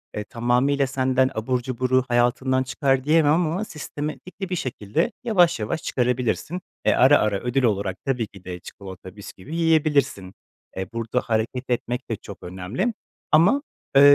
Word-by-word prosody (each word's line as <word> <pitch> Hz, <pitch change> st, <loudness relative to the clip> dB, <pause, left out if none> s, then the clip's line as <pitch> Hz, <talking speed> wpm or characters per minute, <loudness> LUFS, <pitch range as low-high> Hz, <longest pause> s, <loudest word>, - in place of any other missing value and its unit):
eee, 105 Hz, -, -2 dB
tamamıyla 125 Hz, +5 st, +1 dB
senden 130 Hz, 0 st, +2 dB
abur 125 Hz, +3 st, -1 dB
cuburu 130 Hz, +1 st, +1 dB
hayatından 130 Hz, +2 st, +2 dB
çıkar 135 Hz, 0 st, +1 dB
diyemem 150 Hz, 0 st, +4 dB
ama 175 Hz, +4 st, 0 dB
sistematikli 165 Hz, +4 st, -6 dB
bir 180 Hz, -, -1 dB
şekilde 115 Hz, -, -1 dB
yavaş 180 Hz, -, +3 dB
yavaş 135 Hz, +10 st, -3 dB
çıkarabilirsin. 125 Hz, +7 st, -1 dB, 0.2 s
Eee, -, -, +5 dB
ara 135 Hz, +3 st, +6 dB
ara 105 Hz, -2 st, +1 dB
ödül 125 Hz, +4 st, 0 dB
olarak 100 Hz, -4 st, 0 dB
tabii 125 Hz, -5 st, 0 dB
ki 95 Hz, -3 st, -15 dB
de 90 Hz, -1 st, -6 dB
çikolata, 95 Hz, 0 st, -10 dB
bisküvi 100 Hz, -, -9 dB
yiyebilirsin. 145 Hz, -, +2 dB, 0.4 s
Eee, 95 Hz, -, -3 dB
burada 115 Hz, +2 st, -1 dB
hareket 115 Hz, +3 st, -2 dB
etmek 125 Hz, +1 st, -2 dB
de 115 Hz, -, 0 dB
çok 100 Hz, -2 st, -11 dB
önemli 95 Hz, -, -2 dB, 0.4 s
ama, 185 Hz, -, +5 dB, 0.3 s
eee, 135 Hz, -, +8 dB
130 Hz, 150 wpm, -24 LUFS, 110-150 Hz, 0.4 s, eee